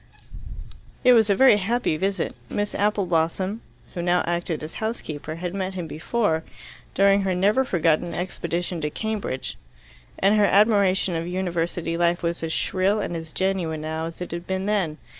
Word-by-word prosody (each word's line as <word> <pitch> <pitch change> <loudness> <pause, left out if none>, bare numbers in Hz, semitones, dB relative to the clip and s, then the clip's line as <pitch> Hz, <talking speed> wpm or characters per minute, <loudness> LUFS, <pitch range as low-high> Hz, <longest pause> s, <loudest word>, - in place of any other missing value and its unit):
It 250 -1 +7
was 220 -3 +5
a 200 - +4
very 260 -2 +6
happy 220 -2 0
visit. 190 +2 -1 0.2
Miss 205 0 -2
Appleblosssom 190 -1 0 0.3
who 175 - -3
now 175 +1 +2
acted 170 -2 -2
as 155 - -7
housekeeper 155 -9 -4
had 175 +1 -4
met 190 -1 -3
him 180 -2 -3
before, 160 +1 -1 0.5
during 200 0 +5
her 190 -2 0
never 205 +8 +3
forgotten 170 -6 +1
expedition 175 -1 -3
to 150 - -1
Cambridge, 210 -6 -4 0.6
and 200 +2 +3
her 210 -1 +5
admiration 200 -3 +3
of 165 +1 -2
University 175 -2 -2
life 175 0 +1
was 170 0 -1
as 165 -1 -3
shrill 195 +5 +1
and 175 - -3
as 160 -1 -6
genuine 180 -5 -1
now 160 +1 -3
as 165 +1 -8
it 180 - -5
had 170 +1 -5
been 190 0 -2
then. 195 -7 0
180 Hz, 165 wpm, -24 LUFS, 165-200 Hz, 0.6 s, It